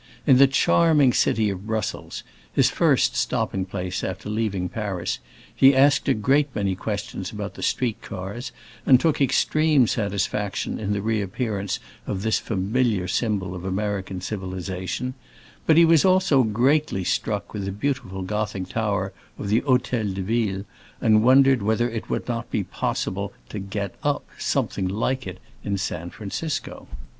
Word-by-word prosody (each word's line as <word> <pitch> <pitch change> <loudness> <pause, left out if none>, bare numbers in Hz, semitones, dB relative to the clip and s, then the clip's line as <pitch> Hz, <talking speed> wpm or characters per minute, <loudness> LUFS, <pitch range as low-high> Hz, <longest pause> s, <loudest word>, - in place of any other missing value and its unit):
In 130 - +6
the 135 +1 +7
charming 145 -1 +4
city 110 -2 +2
of 95 +2 -7
Brussels—his 110 -2 -2
first - - +3
stopping 95 -1 -1
place 90 -1 -4
after 95 +3 -4
leaving 105 -4 -1
Paris—he 95 - 0
asked 140 +1 +4
a 135 - +4
great 140 +7 +2
many 100 -2 0
questions 100 -1 -4
about 105 -2 -5
the - - -10
street 120 -3 -1
cars, 100 +5 -6 0.3
and 130 -3 +6
took 160 -1 +1
extreme 155 0 +3
satisfaction 100 -1 -2
in 105 -1 -1
the 100 -1 -2
reappearance 105 -1 -2 0.3
of 95 -1 -3
this 110 -1 +2
familiar 105 -1 0
symbol 95 -3 -1
of 90 -1 -7
American 95 -1 -2
civilization; 95 +4 -4 0.5
but 160 - +5
he 170 - +8
was 165 -2 +5
also 185 -7 +4
greatly 120 0 +2
struck 105 +3 -2
with 100 -2 -3
the 100 - -2
beautiful 100 -4 -3
Gothic 100 -2 -3
tower 100 -3 -1 0.2
of 100 - -5
the 110 +3 +3
Hôtel 125 -6 0
de 95 - -3
Ville, 105 -2 -1 0.3
and 110 -1 +4
wondered 130 0 +6
whether 110 +3 +1
it 115 -2 -5
would - - -2
not 120 -1 -3
be 100 - -1
possible 100 +2 -3 0.2
to 105 - -5
"get 100 -1 -4
up" - - 0
something 95 -2 -1
like 125 +7 -1
it - - -6 0.3
in 100 -1 -1
San 85 -3 -3
Francisco. 115 - -5
105 Hz, 150 wpm, -24 LUFS, 95-125 Hz, 0.5 s, he